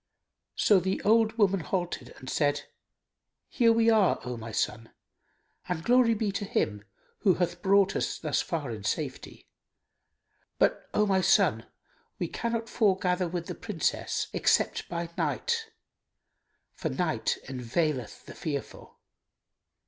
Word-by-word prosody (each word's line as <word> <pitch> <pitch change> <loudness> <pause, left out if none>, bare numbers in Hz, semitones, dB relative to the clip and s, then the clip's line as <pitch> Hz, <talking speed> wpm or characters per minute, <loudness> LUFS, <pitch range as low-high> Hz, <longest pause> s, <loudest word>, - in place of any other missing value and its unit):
So 205 -3 +5
the 190 +2 -1
old 220 +1 +3
woman 195 -3 +3
halted 175 -7 -3
and 130 - -12
said, 145 +1 +1 0.8
"Here 235 -3 +3
we 230 0 +4
are, 215 -4 +3
O 125 0 -3
my 115 -1 -7
son, 115 +2 -2 0.8
and 170 -2 -2
glory 240 0 +4
be 210 -1 -1
to 200 - -3
Him 110 - -1 0.4
who 190 -5 +4
hath 175 -1 -2
brought 195 0 +4
us - - -1
thus 155 -3 0
far 150 -7 -3
in 105 -3 -7
safety! 105 - -4 1.1
But, - - +1
O 210 - +4
my 190 -2 +2
son, 190 +1 +3 0.5
we - - -2
cannot 230 -1 -3
foregather 185 -5 +1
with 170 0 -4
the - - -5
Princess 190 -8 -2
except - - +1
by 170 -1 -4
night; 460 -2 -1 1.0
for - - -3
night - - -1
enveileth 130 0 -2
the - - -10
fearful." 145 -4 -6
180 Hz, 135 wpm, -28 LUFS, 145-215 Hz, 1.1 s, So